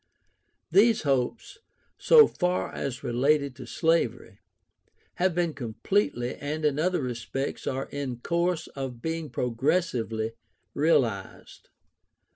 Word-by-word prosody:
These 215 +4 +5
hopes, 140 - -1 0.4
so 460 -2 +8
far 180 - -1
as 130 -1 -4
related 140 +3 +1
to 125 -3 -9
slavery, 125 - 0 0.8
have 180 -1 +1
been 175 -2 0
completely, 125 - -1
and 150 +2 -3
in 145 -1 +1
other 180 -2 +1
respects 125 +3 -4
are 135 +1 -2
in 135 -4 -4
course 170 +2 0
of 130 -4 -6
being 160 -1 -3
progressively 120 -3 -1 0.4
realized. 125 - -1
140 Hz, 105 wpm, -27 LUFS, 125-170 Hz, 0.8 s, so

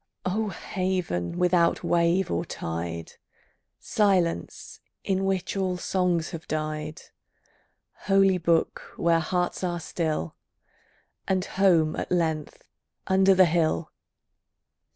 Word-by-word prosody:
O 210 +4 0
haven 180 - -2
without 175 -1 +2
wave 170 +2 +2
or 85 - 0
tide! 85 0 -5 0.7
Silence, 190 -5 0 0.2
in 195 -1 0
which 190 -1 -1
all 185 -2 -1
songs 180 -2 0
have 165 -2 -8
died! 155 +1 -4 1.1
Holy 195 -1 +4
book, 165 -1 0
where 165 -1 +3
hearts 175 +3 -1
are 175 -1 -1
still! 155 - -3 0.9
And 190 -1 +1
home 175 -6 +3
at - - -5
length 160 -4 -1 0.4
under 190 0 +4
the 185 0 +7
hill! 165 -1 0
175 Hz, 105 wpm, -26 LUFS, 160-190 Hz, 1.1 s, the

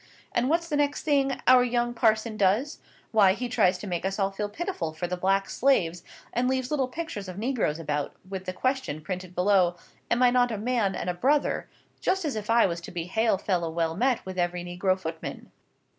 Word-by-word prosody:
And 245 +2 +1
what's 335 +2 +1
the 300 -3 -1
next 290 0 0
thing 275 -3 +1
our 255 -1 +7
young 240 0 0
parson 220 -1 +2
does? 215 +9 +1 0.3
Why 200 -4 +5
he 245 +4 -3
tries 205 -7 +2
to 185 - -8
make 175 -4 -3
us 195 +1 -2
all 195 -1 +1
feel 205 +1 -3
pitiful 255 - -4
for 160 +3 -4
the 180 +1 -2
black 195 +2 +1
slaves, 175 -11 +1 0.3
and 245 +1 +1
leaves 260 0 -1
little 275 -4 +1
pictures 255 - -5
of 185 0 -7
negroes 225 - 0
about, 150 -3 -3
with 190 -1 -6
the 185 - -2
question 255 - -1
printed 180 +2 -6
below, 180 -2 +3 0.3
'Am 240 +2 +2
I 245 - +6
not 245 -1 +3
a 220 - -2
man 220 -2 0
and - - -4
a 180 - 0
brother?' 275 +11 +1 0.3
just 380 -2 0
as 290 - -1
if 215 0 -5
I 230 +1 +5
was 170 -2 -2
to - - -9
be 175 -2 -3
hail 220 +4 +1
fellow 180 -4 -1
well 165 0 -1
met 250 +5 +1
with 185 -1 -5
every 175 0 -1
negro 185 +2 0
footman. 160 -2 -6
205 Hz, 215 wpm, -27 LUFS, 180-250 Hz, 0.3 s, our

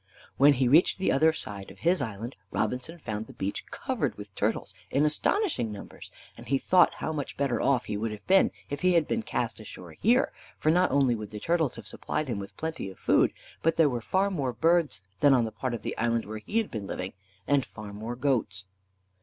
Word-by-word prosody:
When 140 +1 +7
he 130 -1 +2
reached 155 +8 +5
the 190 - +1
other 155 +4 +5
side 100 -10 -7
of - - -13
his 175 -1 +2
island 115 +1 -5
Robinson 125 +10 -2
found 110 -7 -5
the - - -12
beach 100 +1 -4
covered - - -2
with - - -10
turtles - - -1 0.2
in 145 +3 +2
astonishing 150 - +1
numbers, 105 - -9 0.3
and - - -12
he 135 +3 +2
thought 180 +6 +4
how 160 - -3
much 145 -3 -4
better 135 -4 0
off 135 -3 +2
he 105 - -3
would 110 +2 -1
have 105 -1 -8
been 195 +1 +5 0.2
if 145 0 -5
he 185 0 +4
had 165 -3 +3
been 235 - 0
cast - - -2
ashore - - -10
here, 250 +4 +2 0.3
for 155 - +2
not 180 +2 +4
only 135 -3 +3
would 105 -3 -5
the 105 0 -7
turtles 165 0 +1
have 115 - -9
supplied 150 +6 -3
him 110 -4 -2
with 100 - -9
plenty 160 -11 -4
of 95 - -12
food, - - +3 0.3
but 165 0 +2
there 160 -3 +5
were 120 -1 -2
far 190 - +1
more 135 -9 -1
birds 160 - +2 0.2
than 140 -2 +6
on 120 -2 +3
the 110 - -4
part 120 +3 -3
of 110 - -8
the - - -3
island 115 0 +1
where 110 +1 -6
he 205 - -3
had 225 -2 +1
been 105 -3 -5
living, 90 0 -4 0.3
and 140 -2 +3
far 105 -4 -9
more 110 +4 -5
goats. 120 -8 0
130 Hz, 225 wpm, -28 LUFS, 110-160 Hz, 0.3 s, When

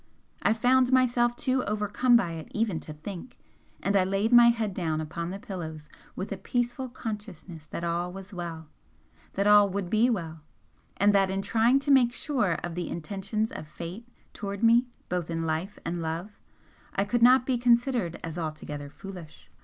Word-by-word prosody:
I - - +3
found 250 +3 +3
myself 240 -2 +3
too 255 -1 0
overcome 210 +4 +2
by 195 -8 +3
it 160 -1 -7
even 210 -7 0
to - - -7
think, 185 +9 -9 0.5
and 200 - +1
I 190 - +5
laid 195 +5 0
my 240 0 +9
head 225 -4 +1
down 160 -4 -1
upon 170 +2 -4
the 190 - -5
pillows 160 -8 -7 0.3
with 190 - -5
a - - -3
peaceful 245 +1 -2
consciousness 195 - -7
that 170 - -6
all 170 +1 -1
was 195 +2 -10
well, 165 -3 -6 0.7
that 200 - 0
all 205 -1 +7
would 195 -2 -3
be 225 +3 +4
well 165 -8 -3 0.6
and 205 +1 +4
that 195 -1 +3
in 195 +1 -2
trying 230 +5 +3
to 285 - 0
make 250 -3 +5
sure 250 - 0
of 175 - -4
the 175 0 -4
intentions 200 +6 -3
of 155 - -7
Fate 175 +9 -8 0.3
towards 200 +1 -5
me 235 +2 +5 0.2
both 175 -2 -2
in 165 0 -2
life 165 +5 -2
and 170 0 -2
love, 165 +6 -5 0.6
I 195 - +1
could 240 +3 0
not 250 +1 +6
be 255 -2 0
considered 240 -6 +2
as 165 +1 -5
altogether 150 -3 -5
foolish. 180 -1 -11
200 Hz, 180 wpm, -27 LUFS, 170-235 Hz, 0.7 s, my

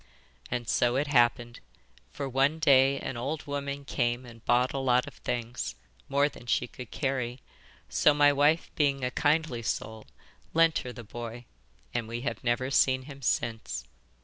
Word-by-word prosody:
And 120 -2 -3
so 120 +4 +2
it 140 +3 +1
happened; 120 -3 +2 0.5
for 140 - -5
one 135 +4 +2
day 140 -3 +5
an 130 - -4
old 135 +5 -3
woman 140 0 -4
came 120 -1 -1
and 115 -2 -13
bought 125 +1 +3
a 135 - -1
lot 125 -1 +3
of - - -10
things 120 -1 -4 0.3
more 140 +1 +3
than 125 -4 -11
she 120 - +1
could 125 -1 -10
carry; 130 -3 -2 0.5
so 70 - +4
my 145 0 +5
wife, 145 +4 +2
being 140 -3 +1
a 125 - 0
kindly 150 -5 +1
soul, 110 -1 -4 0.5
lent 165 -1 +4
her 125 - -6
the 120 - -9
boy, 120 +2 -7 0.5
and 120 -2 -2
we 120 +1 -4
have 140 - -4
never 130 +2 0
seen 130 -1 +3
him 140 0 -11
since. 110 - -1
130 Hz, 170 wpm, -29 LUFS, 120-140 Hz, 0.5 s, day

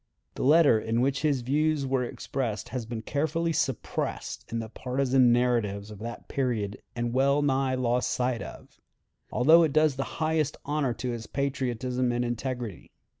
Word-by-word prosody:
The - - -6
letter 145 -4 +5
in 115 +2 0
which 135 +1 +1
his 145 -4 +1
views 150 +3 +1
were 130 -1 +1
expressed 120 -2 -4
has 125 -4 -4
been 115 -1 -5
carefully 160 +5 0
suppressed 135 -6 -3
in 115 - -1
the 115 -1 -3
partisan 130 +1 +2
narratives 115 -4 +1
of 105 - -10
that 115 +2 -7
period 115 -7 -2
and 120 0 -2
wellnigh 135 0 +2
lost 125 -1 +1
sight 125 -1 0
of, - - -10 0.5
although 155 +7 +6
it 160 -4 +2
does 155 -3 +3
the 135 - -4
highest 155 -2 0
honor 145 -4 0
to 125 - -3
his 115 -1 -6
patriotism 130 -3 -1
and 120 0 0
integrity. 120 -4 -4
130 Hz, 160 wpm, -27 LUFS, 120-140 Hz, 0.5 s, although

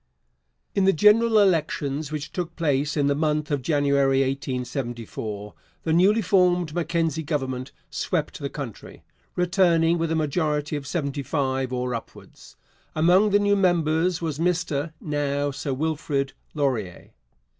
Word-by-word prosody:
In 195 - +2
the 195 - +5
general 215 +6 +5
elections, 155 -6 +1
which 150 -2 -5
took 175 -2 -4
place 150 -2 0
in 145 - +2
the 140 - +3
month 150 0 -1
of 145 -2 0
January 140 -2 +2
1874, 120 -6 -4 0.3
the 160 - 0
newly 200 +6 +4
formed 180 -4 +2
Mackenzie 165 -2 0
Government 135 -4 -3 0.2
swept 160 -5 -2
the 140 -2 -3
country, 135 -8 -8 0.3
returning 175 -2 +3
with 165 0 -1
a - - +1
majority 150 -1 0
of 140 -2 -5
seventy 140 -4 -2
five 130 -2 -1
or 125 0 -2
upwards. 115 - -10 0.4
Among 180 +6 +4
the 205 - +4
new 205 0 +2
members 175 -2 +1
was 155 -3 -3
Mr 165 -3 0
(now 145 -1 -1
Sir 140 0 -4
Wilfrid) 145 -1 -1 0.2
Laurier. 120 - -2
150 Hz, 135 wpm, -24 LUFS, 140-170 Hz, 0.4 s, the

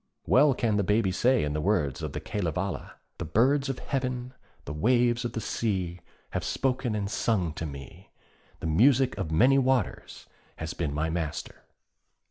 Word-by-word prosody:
Well 140 0 +5
can 110 -5 +1
the 100 - +2
Baby 105 0 +2
say 125 +6 +3
in 75 0 -1
the 75 - -1
words 80 -7 0
of 75 -3 -4
the - - -3
Kalevala, 90 -1 -3 0.3
'The 85 - -3
birds 135 - +2
of 135 - -2
Heaven, 125 -2 -3 0.3
the 70 - -5
waves 120 +7 +2
of 120 - -3
the - - -2
sea, 95 -5 -2 0.3
have - - -2
spoken 130 -3 -1
and 100 -2 -1
sung 100 -5 0
to 80 0 -4
me; 70 -2 -10 0.5
the - - -5
music 125 - +4
of 90 -5 -2
many 125 +12 +5
waters 130 -5 -1 0.3
has 80 +1 -5
been 80 -4 -2
my 80 +3 -1
master.' 80 -3 -4
105 Hz, 170 wpm, -28 LUFS, 80-125 Hz, 0.5 s, Well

